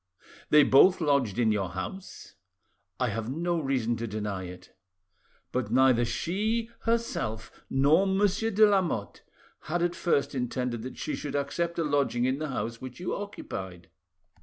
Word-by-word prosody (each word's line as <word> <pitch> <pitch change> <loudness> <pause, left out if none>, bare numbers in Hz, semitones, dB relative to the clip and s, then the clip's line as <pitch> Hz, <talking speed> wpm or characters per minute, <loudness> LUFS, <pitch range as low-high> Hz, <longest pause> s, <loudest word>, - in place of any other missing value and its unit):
"They 150 -1 +7
both 140 +8 +6
lodged 140 - +1
in 115 -3 +3
your 100 -4 -1
house?" 95 - -7 0.7
"I 125 -2 +1
have 110 +1 -3
no 170 +4 -1
reason 130 -5 0
to 115 +1 -4
deny 105 -3 -4
it." 90 0 -11 0.8
"But 125 0 -2
neither 130 -2 +4
she 215 - -1
herself, 230 - -1 0.2
nor 150 +8 +4
Monsieur 200 +3 +1
de 215 0 +5
Lamotte, 180 - 0 0.4
had 170 +2 -1
at 175 0 +1
first 150 -6 0
intended 125 -2 -2
that 130 +3 -7
she - - -3
should 145 -1 -5
accept 170 +4 -2
a 165 - +1
lodging 140 -5 +1
in 130 +2 0
the 155 -1 -3
house 115 -3 -4
which 130 +2 -8
you 180 - -3
occupied." 95 - -7
140 Hz, 155 wpm, -28 LUFS, 115-175 Hz, 0.8 s, They